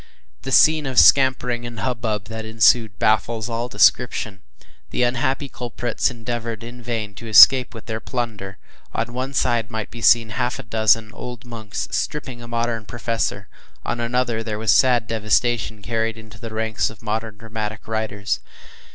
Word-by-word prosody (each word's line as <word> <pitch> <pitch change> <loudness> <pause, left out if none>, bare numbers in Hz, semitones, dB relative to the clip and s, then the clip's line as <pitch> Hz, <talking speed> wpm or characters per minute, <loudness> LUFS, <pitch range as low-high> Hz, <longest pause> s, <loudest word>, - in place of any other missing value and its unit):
The 135 - -6
scene 155 +2 +5
of 130 -1 -5
scampering 125 -3 +4
and 120 -1 -7
hubbub 115 -5 -2
that 110 0 -7
ensued 110 0 +3
baffles 110 +1 +1
all 115 +1 -2
description. 110 -5 +2 0.5
The 125 - 0
unhappy 130 +3 0
culprits 120 -1 -2
endeavored 115 -2 -5
in 120 +1 -10
vain 115 -3 -4
to 115 +4 -10
escape 125 +4 +7
with 110 - -10
their 110 -1 -4
plunder. 105 -4 -5 0.4
On 120 - -2
one 130 +2 -4
side 115 -3 +1
might 110 -2 -5
be 115 - -9
seen 115 0 +5
half 125 +5 -2
a 135 - -8
dozen 110 -1 +2
old 125 0 -8
monks, 110 -3 -6
stripping 120 - -3
a 120 - -9
modern 115 -1 -2
professor; 115 0 -3 0.4
on - - -2
another, 120 -1 -1
there 110 -2 -4
was 110 +1 +2
sad 125 -3 +4
devastation 115 0 0
carried 115 0 -2
into 110 -1 -13
the 115 -1 -7
ranks 110 0 -1
of 110 0 -14
modern 110 0 -3
dramatic 110 -1 -6
writers. 110 -2 -2
115 Hz, 160 wpm, -21 LUFS, 110-120 Hz, 0.5 s, escape